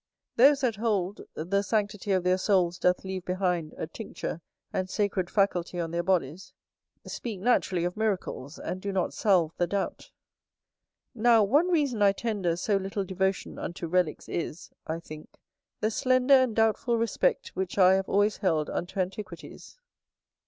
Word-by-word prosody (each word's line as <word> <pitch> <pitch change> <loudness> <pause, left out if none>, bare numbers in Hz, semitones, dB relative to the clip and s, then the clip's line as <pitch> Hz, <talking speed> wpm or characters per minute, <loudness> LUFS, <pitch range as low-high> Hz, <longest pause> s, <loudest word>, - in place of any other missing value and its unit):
Those 275 +3 +6
that 235 -6 0
hold, 205 -3 -1
the 185 +6 0
sanctity 205 -1 -1
of 185 -2 +2
their 180 +1 +2
souls 185 -3 +2
doth 180 0 +2
leave 190 -1 -5
behind 180 -3 -1
a - - -3
tincture 170 -2 -6 0.3
and 185 0 -2
sacred 195 -3 -1
faculty 180 -3 0
on 165 -1 -2
their 170 0 0
bodies, 175 -2 -1 0.5
speak 220 -6 -5
naturally 190 -5 +1
of 175 +1 -2
miracles, 195 -9 -2
and 185 - -5
do 200 - -3
not 190 -2 -1
salve 175 -6 +2
the 175 - +1
doubt. 200 +1 -3 1.0
Now, 230 -2 +4
one 285 - +3
reason 290 -11 +1
I 200 -1 +5
tender 200 -6 -1
so 200 +4 +1
little 195 +1 -3
devotion 190 +1 -2
unto 170 0 -5
relicks 180 -2 0
is, 165 -1 -5 0.2
I 160 +1 -2
think 155 -2 -11 0.5
the 215 +1 +1
slender 255 +3 +3
and 260 -4 +5
doubtful 225 +2 +2
respect 230 -2 0
which 190 -1 -4
I 185 -1 +7
have 190 0 0
always 205 +2 +2
held 160 -5 0
unto 185 +3 -4
antiquities. 185 - -6
190 Hz, 160 wpm, -28 LUFS, 175-215 Hz, 1.0 s, I